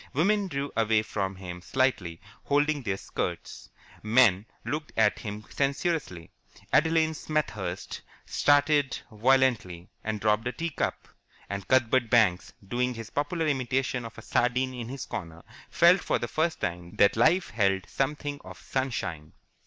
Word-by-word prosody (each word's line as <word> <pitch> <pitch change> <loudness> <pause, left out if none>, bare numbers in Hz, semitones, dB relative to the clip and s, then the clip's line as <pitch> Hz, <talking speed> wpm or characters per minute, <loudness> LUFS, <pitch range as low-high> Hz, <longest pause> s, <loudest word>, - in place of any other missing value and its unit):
Women 200 +7 +2
drew 140 -4 -3
away 110 -1 +2
from 95 -3 -3
him 90 -2 -8
slightly, 100 -9 0 0.3
holding 145 +1 +2
their 100 -6 -2
skirts. - - -5 0.3
Men 110 -3 +4 0.2
looked 150 +1 -3
at 110 -2 +3
him 105 -1 -6
censoriously. 135 - -2 0.4
Adeline 160 0 +3
Smethurst 105 - -3 0.2
started 145 -1 +3
violently, 110 -7 +1
and 110 -1 -2
dropped 105 +2 +1
a 125 - -2
tea 170 0 -3
cup. - - -3 0.4
And 100 -1 -4
Cuthbert 130 -2 +3
Banks, 105 -7 +3 0.2
doing 125 +3 -1
his 115 -1 -8
popular 160 +3 -1
imitation 130 -3 0
of 115 - -9
a 115 - -10
sardine 125 +2 +1
in 120 -2 -6
his 135 0 -5
corner, 85 -1 -7 0.3
felt 175 +2 +5
for - - +1
the 120 - -3
first 160 +6 -1
time 85 0 -4
that 100 - +4
life 160 +11 +3
held 95 -4 +1
something 145 +1 -2
of - - -10
sunshine. 95 - -3
125 Hz, 145 wpm, -28 LUFS, 100-145 Hz, 0.4 s, felt